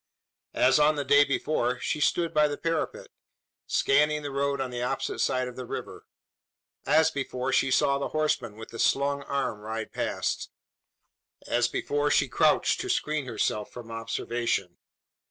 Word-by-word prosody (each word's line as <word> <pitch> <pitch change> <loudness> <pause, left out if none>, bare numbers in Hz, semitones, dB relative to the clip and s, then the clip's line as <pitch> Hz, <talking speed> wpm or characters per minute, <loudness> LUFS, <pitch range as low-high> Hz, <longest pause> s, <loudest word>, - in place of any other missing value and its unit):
As 130 +2 +4
on 150 +1 +4
the 145 -1 -2
day 145 +2 +6
before, 130 -3 -1
she 150 - -2
stood 170 +2 +1
by 150 0 +4
the 145 -1 -4
parapet 165 -1 -2 0.6
scanning 150 +2 +2
the 145 - -4
road 140 0 -1
on 130 -2 -3
the 120 0 -4
opposite 125 - -2
side 130 0 +1
of 125 - -8
the 130 - -6
river; - - -7 0.8
as 160 +1 +4
before, 130 -2 -3
she 135 - +3
saw 140 +1 +2
the 140 - -2
horseman 155 -8 -1
with 110 +1 -10
the 115 - -9
slung 140 +1 +2
arm 140 -6 -2
ride 110 +1 -5
past; - - -2 1.0
as 120 0 +2
before, 145 +4 -1
she - - +3
crouched - - +2
to - - -5
screen 150 -3 -1
herself 105 -2 -2
from 115 -2 -10
observation. 115 -4 -2
135 Hz, 160 wpm, -27 LUFS, 120-145 Hz, 1.0 s, day